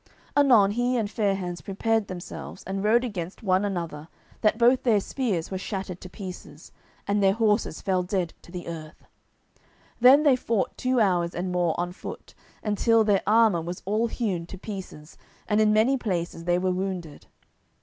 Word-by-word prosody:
Anon 245 -9 +5
he 245 +3 0
and 215 -3 -1
Fair 205 -3 +1
hands 180 -2 -5
prepared 220 +2 0
themselves 185 +1 -8
and 195 +1 -4
rode 230 +3 +4
against 190 -3 -5
one 190 -1 +2
another 170 -6 -4 0.3
that 215 0 +3
both 245 +2 +4
their 225 -5 +3
spears 200 -7 -2
were 190 - -3
shattered 190 -2 -5
to 180 - -9
pieces, 180 -5 -10 0.4
and 205 +1 +1
their 195 -1 +4
horses 215 -5 +1
fell 185 -2 +1
dead 180 -2 -2
to - - -16
the 180 -1 -7
earth. 160 -2 -8 0.9
Then 260 +5 +7
they 285 -4 +5
fought 230 -5 -1
two 255 0 0
hours 175 -5 +1
and 180 +1 -2
more 175 -2 0
on 175 0 -1
foot, 180 - -9 0.3
until 220 +2 +3
their 205 -2 +2
armour 215 -5 +4
was 175 +2 -6
all 215 +4 +1
hewn 195 -8 -2
to 190 - -9
pieces, 185 -6 -9 0.3
and 210 0 +2
in 215 -1 +4
many 225 +6 +3
places 175 -7 -3
they 175 0 +2
were 185 +1 0
wounded. 180 -4 -4
195 Hz, 175 wpm, -26 LUFS, 180-225 Hz, 0.9 s, Then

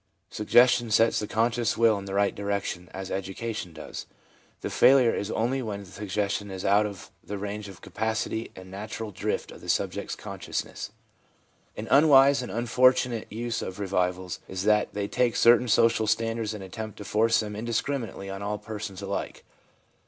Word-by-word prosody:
Suggestion 120 +2 +4
sets 115 +2 +4
the 105 - -3
conscious 115 +2 +1
will 115 -1 +5
in 100 - -8
the 100 0 -5
right 100 0 +2
direction 100 -3 -3
as 95 0 -6
education 95 0 -4
does.' 80 -1 -8
1 - - -34 0.5
The - - -3
failure 125 -2 +5
is 100 - -3
only 125 +5 0
when 105 -4 -4
the 95 -4 -13
suggestion 105 0 -2
is 95 0 -6
out 100 +2 +4
of 100 -3 -10
the 105 - -5
range 105 +1 -5
of 95 - -10
the - - -20
capacity 110 0 -2
and 95 0 -11
natural 105 +2 -6
drift 90 - -3
of - - -12
the - - -9
subject's - - -1
consciousness. - - -5 0.9
An 110 - -5
unwise 140 -2 +6
and 125 - -6
unfortunate 120 +1 +2
use 115 +2 -3
of 95 - -5
revivals 90 -2 -1
is 95 0 -4
that 105 0 +3
they 100 -1 -1
take 120 +1 +1
certain 120 +1 +5
social 115 -1 +3
standards 115 0 0
and 100 - -7
attempt 110 +2 -7
to - - -7
force 110 +2 +3
them 105 -1 -3
indiscriminately 115 -1 -3
on 95 0 -6
all 105 +1 -2
persons 105 -2 -7
alike. 100 0 -4
105 Hz, 175 wpm, -27 LUFS, 100-115 Hz, 0.9 s, unwise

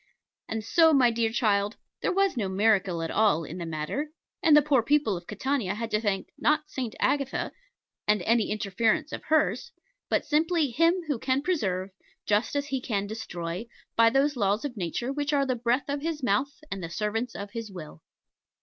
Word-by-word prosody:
And 220 -1 -3
so, 325 +5 +5
my 255 -4 +5
dear 225 -1 0
child, 210 -2 +1 0.3
there - - +1
was 390 -1 +2
no 205 -6 -1
miracle 190 -4 +2
at 165 - -3
all 210 -6 +3
in 165 +4 -7
the 170 - -4
matter; 165 - -3 0.3
and 305 -2 +6
the 300 - +6
poor 280 -4 +3
people 285 -4 +2
of 175 0 -8
Catania 215 -2 -1
had 230 0 -4
to 210 0 +1
thank 200 -3 -1
not 300 0 +2
St. 250 -5 -4
Agatha, 275 -2 0 0.6
and 210 -3 +3
any 230 +1 +2
interference 220 - 0
of - - -6
hers, 300 - +1 0.4
but - - +1
simply 315 -2 +2
Him 335 +7 +3
who 285 -6 -1
can 260 +3 0
preserve, 195 - -1 0.3
just 210 +5 +1
as 285 0 0
He 265 -1 -1
can 205 -5 -1
destroy, 185 -2 -5 0.3
by 230 0 +6
those 275 +4 +2
laws 205 +1 +1
of 265 -4 -4
nature 215 +7 -3
which 290 +1 -1
are 280 -1 +3
the 255 -1 0
breath 245 +3 0
of 285 0 -2
His 315 -2 -3
mouth 250 +6 +1 0.2
and 195 - -4
the 165 - -4
servants 220 +6 -2
of 200 0 -6
His 230 -3 -6
will. 155 - -10
230 Hz, 195 wpm, -27 LUFS, 200-285 Hz, 0.6 s, and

